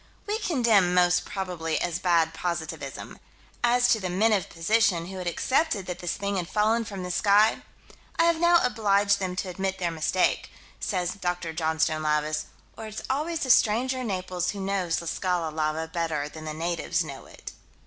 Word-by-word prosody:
We 420 +1 -1
condemn 230 - +3
"most 180 0 +3
probably" 175 -5 -3
as 175 0 -2
bad 170 -3 +2
positivism. 170 -1 -5 0.4
As 245 +1 +4
to 220 - +4
the 185 -2 -3
"men 215 +5 +3
of 195 -3 0
position," 180 0 +2
who 190 +2 -8
had 180 - -5
accepted 235 - 0
that 180 -1 -5
this 175 +1 -2
thing 200 0 -2
had 175 -1 -3
fallen 220 +2 +2
from 195 -3 -6
the 180 - -4
sky 205 +3 +4 0.6
"I 330 - +4
have 335 -1 +3
now 345 0 +5
obliged 200 -3 +2
them 185 -2 -3
to 185 0 -3
admit 190 +1 -2
their 175 -2 -1
mistake," 165 +3 0 0.3
says 180 -3 -1
Dr. 175 -4 -3
Johnstone 160 -1 0
Lavis 150 0 0 0.3
or 220 - -7
it's 215 0 -7
always 310 +4 -1
the 260 - +2
stranger 245 +4 +3
in 250 - -3
Naples 185 -2 -2
who 205 - -4
knows 190 -3 -1
La 170 - -8
Scala 175 -2 -1
lava 155 +1 -1
better 160 -3 -2
than 155 +1 -10
the 155 - -4
natives 170 +1 -1
know - - -9
it. - - -10
185 Hz, 185 wpm, -26 LUFS, 170-215 Hz, 0.6 s, now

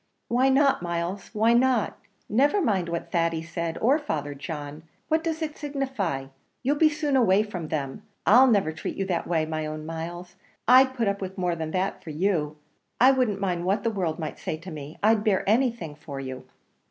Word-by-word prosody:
"Why 255 +3 +3
not, 275 -3 +3
Miles? 175 +3 -3
why 225 +2 +3
not? 245 -2 +2 0.3
never 280 - +3
mind 195 - +1
what 170 0 -4
Thady 165 -1 0
said 170 0 -4
or 270 +7 +3
Father 150 - -3
John. 145 +1 -7 0.3
What 320 0 +2
does 325 -1 -2
it 305 -1 -5
signify? 265 - -2 0.4
you'll 285 +3 +1
be 310 +1 +5
soon 295 -2 -1
away 210 -5 +4
from 180 -7 -6
them. 140 -4 -3 0.2
I'll 250 +6 +7
never 200 -8 +3
treat 160 - -5
you 195 - -1
that 175 -3 -2
way, 160 -2 +1
my 155 -1 -3
own 155 0 -6
Myles 175 +3 -6 0.3
I'd 260 +2 +6
put 235 -4 0
up 200 0 -1
with 190 +1 -5
more 180 -2 0
than 160 -1 -4
that 190 +1 -1
for - - -9
you 155 -2 0 0.4
I 255 +2 +7
wouldn't 250 -7 +1
mind 180 -3 -1
what 195 +3 +1
the 230 - +1
world 180 -7 -2
might 155 -2 -5
say 155 - -3
to 180 +3 -10
me 150 0 -8
I'd 215 0 +4
bear 205 -4 +1
anything 230 - +1
for 145 -2 -8
you!" 130 -1 -7
190 Hz, 200 wpm, -26 LUFS, 160-245 Hz, 0.4 s, I'll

